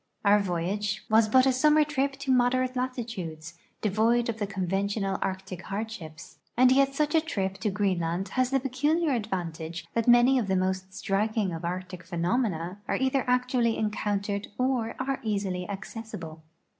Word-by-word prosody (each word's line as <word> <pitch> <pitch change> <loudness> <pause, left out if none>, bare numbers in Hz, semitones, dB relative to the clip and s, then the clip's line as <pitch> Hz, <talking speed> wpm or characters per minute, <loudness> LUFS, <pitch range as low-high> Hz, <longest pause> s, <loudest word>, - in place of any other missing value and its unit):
Our 205 +1 +6
voyage 195 +3 -2
was 220 0 +5
but 255 +3 +5
a 265 - +4
summer 300 +4 +5
trip 280 -2 0
to 275 0 -3
moderate 255 0 +2
latitudes, 190 -11 -4 0.2
de 215 - +1
void 230 +3 +2
of 230 -1 -3
the 205 - -1
conventional 195 +1 -1
Arctic 190 -1 -4
har(lshii)s; 195 -6 -6 0.2
and 255 +1 +6
yet 275 +1 +3
such 300 +1 +1
a 320 - +5
trip 195 -11 -3
to 210 - 0
Greenland 185 -2 -1
has 255 -1 +1
the 270 0 +2
peculiar 290 +5 +1
advantage 175 -7 -3
tliat 230 0 0
many 245 +2 +6
of 220 - -2
the 190 - +1
most 185 0 -1
striking 205 -1 0
of 165 - -6
Arctic 180 +1 -4
phenomena 180 +1 -1
are - - 0
either 265 0 +1
actually 250 -2 +2
encountered 205 -1 -1
or 250 -3 0
are 270 +1 -1
easily 200 -5 -2
accessible. 195 -6 -7
210 Hz, 160 wpm, -27 LUFS, 185-255 Hz, 0.2 s, Our